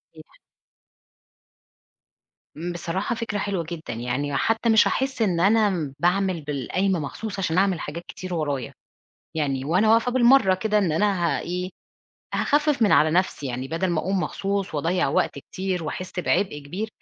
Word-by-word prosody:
يح 155 - -12 2.5
بصراحة 175 +6 -2
فكرة 225 -2 -3
حلوة 195 -3 -1
جدًا، 165 -7 -6
يعني 125 +5 -2
حتى 225 +1 +1
مش 220 -1 +6
هاحس 265 -2 -1
إن 185 -6 +2
أنا 195 -7 +2
باعمل 180 -1 +1
بالقايمة 150 +6 -1
مخصوص 200 +8 -5
عشان 175 -3 0
أعمل 190 -2 +2
حاجات 165 +4 -6
كتير 185 -1 -7
ورايا، 145 -7 -2 0.6
يعني 135 -4 -1
وأنا 185 +9 +3
واقفة 230 +2 +3
بالمرة 240 -5 +5
كده 210 +2 +1
إن 190 -6 +1
أنا 185 0 +1
ها - - -3
إيه؟ 180 +1 -4 0.6
هاخفف 295 -3 +2
من 210 - +4
على 155 - +5
نفْسِي 175 -4 0
يعني، 130 +1 -4
بدل 165 +5 -1
ما 165 -2 +1
أقوم 190 +2 -1
مخصوص 195 0 -2
وأضيع 165 +2 +1
وقت 140 - 0
كتير 185 +3 -4
وأحس 185 +4 -4
بعبء 185 -3 0
كبير، 180 +10 -5
185 Hz, 150 wpm, -24 LUFS, 155-205 Hz, 2.5 s, مش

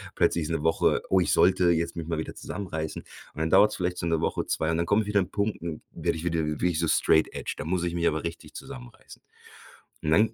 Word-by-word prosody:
Plötzlich 85 -3 +2
ist - - -5
'ne 80 -2 -2
Woche 80 0 +2
oh, 95 - +4
ich 90 - +1
sollte 90 -1 +4
jetzt 85 0 0
mich 85 -2 -5
mal 80 - -2
wieder 80 - -4
zusammenreißen 80 -6 -5 0.3
und - - -7
dann 80 0 -1
dauert's 100 +2 +5
vielleicht 90 -1 -2
so 85 - -2
'ne 80 -1 +1
Woche, - - -1
2 80 +1 0
und 80 - 0
dann 85 - -1
kommt 105 +2 +2
wieder 105 -1 +2
'n 90 - -1
Punkt, 100 +1 -1 0.3
werde - - -2
ich 80 - -7
wieder 85 -2 0
wirklich 80 +2 0
so 85 - +1
straight 80 0 +3
edge. - - -4
Da - - -4
muss 90 +1 -1
ich 85 - -1
mich 85 -1 +1
aber 80 - 0
richtig 85 -2 -7
zusammenreißen. 130 -3 -11 0.8
Und 75 - -1
dann 110 +6 +4
85 Hz, 245 wpm, -27 LUFS, 80-95 Hz, 0.8 s, dauert's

